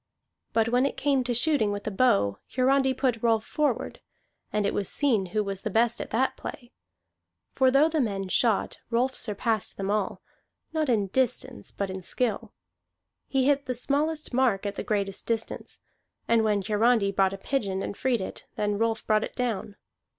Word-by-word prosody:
But 225 0 +2
when 250 +3 +3
it - - -6
came 275 -2 +2
to 245 - 0
shooting 240 -4 +3
with 205 0 -4
the 215 - -3
bow, 195 - +2 0.2
Hiarandi 265 +1 +3
put 250 -4 0
Rolf 225 -2 +2
forward, 300 -2 -1 0.5
and 210 -1 0
it 200 - 0
was 200 - -1
seen 230 -10 +1
who 210 +4 0
was 195 -1 -4
the - - -3
best 230 +3 +2
at - - -6
that 255 +4 +1
play. 255 -5 -8 0.8
For 260 -1 +4
though 275 +4 +5
the 320 -2 0
men 195 -5 -2
shot, 220 +2 +1
Rolf 250 +3 +1
surpassed 215 0 -1
them 195 0 -2
all, 210 -2 -1 0.5
not 310 -3 0
in 215 -5 +2
distance 240 - -1
but 200 -1 -3
in 190 0 -5
skill. 225 +3 -2 0.8
He 265 -2 +1
hit 280 -1 +2
the 255 - -1
smallest 295 +4 -1
mark 240 -6 +2
at 200 - -2
the - - -4
greatest 200 -2 -2
distance; 230 -1 -3 0.5
and 230 -1 +4
when 210 -2 +1
Hiarandi 215 0 +3
brought 195 -1 +2
a - - -5
pigeon 195 -4 -2
and - - -4
freed 245 -2 0
it, 190 - -7
then 205 -1 -1
Rolf 225 -1 0
brought 215 0 +3
it - - -6
down. 230 -5 -2
225 Hz, 185 wpm, -27 LUFS, 200-260 Hz, 0.8 s, though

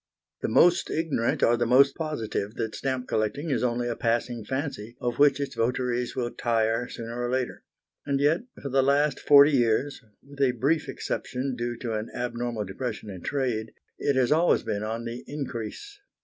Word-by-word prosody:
The - - -1
most 175 0 +4
ignorant 155 -8 0
are 120 - +5
the 120 0 0
most 135 +3 +6
positive 115 -9 -3
that 110 -2 -3
stamp 130 0 -3
collecting 140 +9 -1
is 120 -4 +1
only 120 0 0
a 120 - -2
passing 120 0 -1
fancy 120 -2 -4
of 120 +1 -2
which 145 -1 +5
its 140 - -3
votaries 125 +1 -1
will 120 -2 -2
tire, 115 0 0
sooner 115 +1 -6
or 120 - -1
later; 130 0 -2 0.4
and 140 -1 0
yet 150 +6 +3 0.2
for 140 - -3
the 135 +1 +3
last 140 +1 +2
forty 145 +1 +7
years, 130 +1 +1 0.3
with 140 0 -9
a 130 -2 +4
brief 150 +6 +1
exception, 130 0 -3
due 120 0 -3
to 115 -1 -4
an 110 +1 -3
abnormal 120 -3 -3
depression 105 +1 -5
in 95 -2 -8
trade, 120 -5 -2 0.3
it 140 - +1
has 130 -1 +2
always 165 +3 +4
been 100 - -2
on 115 +2 -3
the 115 +1 -6
increase. 145 - -6
125 Hz, 180 wpm, -27 LUFS, 115-140 Hz, 0.4 s, forty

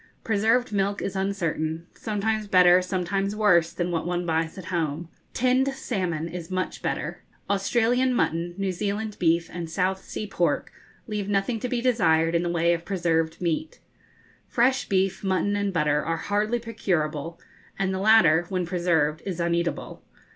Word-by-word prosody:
Preserved 225 +3 +1
milk 200 0 0
is 195 - -4
uncertain 170 -4 -2
sometimes 215 0 -2
better, 180 -1 +6
sometimes 195 +2 -1
worse, 175 -6 +4
than 175 0 -2
what 165 -2 -1
one 175 0 -1
buys 160 +1 -1
at 185 - -8
home. 165 0 -2 0.3
Tinned 255 +2 +2
salmon 180 - -2
is 170 0 -7
much 185 0 -3
better. - - -3 0.3
Australian 240 +5 +2
mutton, 170 -5 0
New 195 -1 -1
Zealand 205 +3 -3
beef, 165 0 +2
and 170 -2 -5
South 190 +3 -1
Sea 215 - -5
pork, 175 -4 -1 0.3
leave 210 -3 -3
nothing 205 +3 0
to 250 - -3
be 240 -1 -1
desired 165 -10 +3
in 170 - +2
the 175 - -1
way 170 0 +2
of 170 -1 -3
preserved 165 -4 0
meat. 175 - -2 0.7
Fresh 260 +3 +1
beef, 190 0 +1
mutton, 195 +1 +1
and 200 -1 0
butter 150 -3 +1
are 165 0 -1
hardly 210 +6 0
procurable, 170 -9 -2 0.4
and 190 -1 0
the 190 - -2
latter, 180 -6 +5
when 185 -2 -1
preserved, 165 -3 +1
is 180 -3 -3
uneatable. 170 0 -1
185 Hz, 160 wpm, -25 LUFS, 170-205 Hz, 0.7 s, better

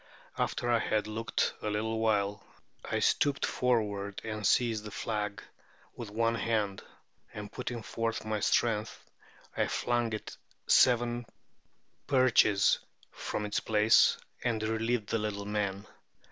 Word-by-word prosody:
After 120 - -1
I 120 -1 +3
had 105 -1 0
looked 110 +1 -1
a 105 - -2
little 110 +2 -1
while, 105 -2 +1 0.4
I - - -2
stooped 145 -1 +2
forward 105 -5 0
and 105 -2 -2
seized 115 -3 +2
the 105 - -7
flag 105 0 -3 0.5
with 115 -3 -7
one 115 +2 +1
hand; 110 -4 -1 0.5
and 105 -1 -7
putting 120 -2 -5
forth 115 0 -3
my 110 -1 -1
strength, 110 +1 0 0.5
I - - +1
flung 120 -1 0
it 110 - -6 0.3
seven 120 -1 +3 0.8
perches 130 -7 +4 0.3
from 105 - -4
its 105 - -1
place, 110 0 +4 0.3
and 115 -3 0
relieved 110 0 -1
the 115 - +1
little 105 -1 -3
men. 100 -1 -2
110 Hz, 130 wpm, -30 LUFS, 105-115 Hz, 0.8 s, perches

